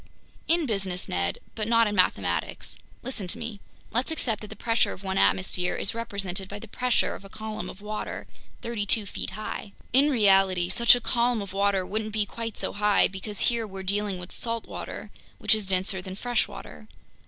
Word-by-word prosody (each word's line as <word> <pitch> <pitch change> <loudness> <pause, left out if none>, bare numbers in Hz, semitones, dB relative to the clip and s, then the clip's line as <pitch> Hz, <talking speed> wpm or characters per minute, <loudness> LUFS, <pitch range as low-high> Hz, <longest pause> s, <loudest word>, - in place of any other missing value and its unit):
"In 330 0 +3
business, 195 -6 -2
Ned, 85 0 0 0.2
but 215 -2 -2
not 230 0 +5
in 210 - 0
mathematics. 95 - +1 0.3
Listen 235 -7 -3
to 205 - -4
me. 230 -3 -5 0.3
Let's 245 +6 +1
accept 245 -9 0
that 210 - -7
the - - -9
pressure 230 -1 +1
of 195 - -12
one 190 0 0
atmosphere 180 -1 +2
is - - +1
represented 195 -4 -3
by 205 - -5
the 230 - -9
pressure 250 +3 +1
of - - -9
a 195 - -11
column 215 -3 -5
of 190 - -10
water 210 +1 -4 0.4
thirty 230 -3 -2
two 215 +1 +4
feet - - -4
high. 215 -1 -5 0.2
In 275 +4 +6
reality, 195 -7 +4
such 235 +5 +6
a 245 - -3
column 240 0 +2
of 200 -2 -6
water 195 -1 +2
wouldn't 215 +2 -3
be 215 -1 +2
quite 225 +1 -5
so - - -2
high 210 0 +4
because 195 +1 -5
here 230 -2 +1
we're 195 -1 -7
dealing 200 0 0
with 180 0 -8
salt 230 -1 -1
water, - - -7 0.3
which - - +3
is 215 -3 -1
denser 190 0 +1
than 185 0 -7
fresh 240 +2 +1
water. 205 +1 -10
205 Hz, 200 wpm, -27 LUFS, 190-230 Hz, 0.4 s, In